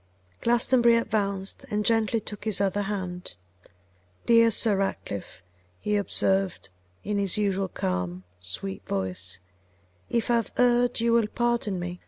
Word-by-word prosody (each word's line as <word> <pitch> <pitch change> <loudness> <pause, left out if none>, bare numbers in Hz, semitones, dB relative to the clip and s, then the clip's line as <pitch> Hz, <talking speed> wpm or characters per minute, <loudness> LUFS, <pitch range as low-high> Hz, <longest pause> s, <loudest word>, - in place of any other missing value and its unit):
Glastonbury 240 0 +4
advanced, 200 -4 -2
and 210 0 -1
gently 225 0 +2
took 210 0 -8
his 215 -3 +1
other 200 +1 +1
hand. 185 - -4 0.9
'Dear 230 -1 +6
Sir 215 -2 +3
Ratcliffe,' 100 - -4 0.4
he 210 - -1
observed, 195 - +1 0.3
in 205 0 -1
his 200 -1 0
usual 195 -2 0
calm, 90 - -3 0.2
sweet 90 +1 -5
voice, 95 -1 -3 0.7
'if 235 0 0
I 235 - +4
have 230 - -3
erred 245 -1 +3
you 230 0 +2
will 230 -2 +3
pardon 235 -4 0
me. 175 0 -5
205 Hz, 135 wpm, -26 LUFS, 180-230 Hz, 0.9 s, Dear